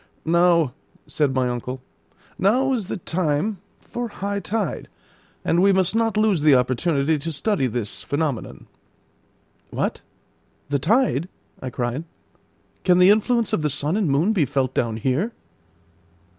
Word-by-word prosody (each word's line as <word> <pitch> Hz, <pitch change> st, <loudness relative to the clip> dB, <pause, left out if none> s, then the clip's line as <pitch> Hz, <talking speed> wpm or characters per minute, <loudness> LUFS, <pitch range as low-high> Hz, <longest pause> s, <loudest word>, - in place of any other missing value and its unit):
"Now," 170 Hz, -4 st, +3 dB, 0.3 s
said 145 Hz, -3 st, 0 dB
my 130 Hz, -1 st, +2 dB
uncle, 125 Hz, +1 st, -4 dB, 0.6 s
"now 255 Hz, +7 st, +3 dB
is 220 Hz, -7 st, -2 dB
the -, -, -3 dB
time 170 Hz, +3 st, -1 dB, 0.2 s
for 240 Hz, 0 st, -5 dB
high 200 Hz, -1 st, -3 dB
tide, 200 Hz, -1 st, -3 dB, 0.6 s
and 170 Hz, -, +2 dB
we 200 Hz, +1 st, +5 dB
must 190 Hz, 0 st, +2 dB
not 225 Hz, -1 st, +1 dB
lose 215 Hz, -6 st, +2 dB
the 150 Hz, -2 st, +6 dB
opportunity 140 Hz, +4 st, +1 dB
to 165 Hz, +3 st, -4 dB
study 160 Hz, -1 st, 0 dB
this 115 Hz, -3 st, -3 dB
phenomenon." 145 Hz, -4 st, -3 dB, 1.0 s
"What! -, -, -2 dB, 0.7 s
the 140 Hz, -1 st, +1 dB
tide!" 190 Hz, -, +1 dB, 0.3 s
I 130 Hz, -, -4 dB
cried. 125 Hz, +5 st, -3 dB, 0.8 s
"Can 180 Hz, -1 st, +4 dB
the 180 Hz, +2 st, +7 dB
influence 230 Hz, +2 st, +2 dB
of -, -, +1 dB
the 150 Hz, -, 0 dB
sun 145 Hz, +4 st, 0 dB
and 205 Hz, -7 st, +1 dB
moon 155 Hz, +10 st, +2 dB
be 175 Hz, -8 st, +2 dB
felt 130 Hz, 0 st, -1 dB
down 115 Hz, -2 st, -1 dB
here?" 135 Hz, -, -1 dB
165 Hz, 145 wpm, -23 LUFS, 140-200 Hz, 1.0 s, the